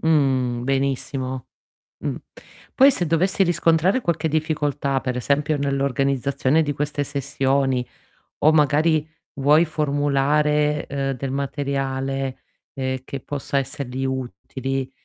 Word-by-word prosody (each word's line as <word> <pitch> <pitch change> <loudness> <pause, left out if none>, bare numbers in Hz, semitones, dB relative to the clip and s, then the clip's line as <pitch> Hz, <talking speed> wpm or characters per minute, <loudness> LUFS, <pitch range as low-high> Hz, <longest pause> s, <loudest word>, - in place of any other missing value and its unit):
Mh. 130 -6 +2
Benissimo. 135 -1 -2 0.5
Mh. - - -3 0.6
Poi, 275 +1 +7
se 175 -9 -1
dovessi 185 +5 +2
riscontrare 170 +5 +2
qualche 170 -6 0
difficoltà, 145 -3 0
per 125 -1 -3
esempio 145 +4 +1
nell'organizzazione 140 +1 +1
di 145 - -1
queste 145 0 -2
sessioni, 135 -2 0 0.5
o 155 +1 +5
magari 155 +1 +3 0.3
vuoi 145 +4 +4
formulare, 150 0 +1
uhm, 135 -1 -1
del 130 +1 -4
materiale, 135 -1 -2 0.3
ehm, 130 -1 -2
che 135 0 -6
possa 140 0 -2
essergli 135 -1 -4
utili, 130 +1 -3
140 Hz, 110 wpm, -22 LUFS, 135-150 Hz, 0.6 s, Poi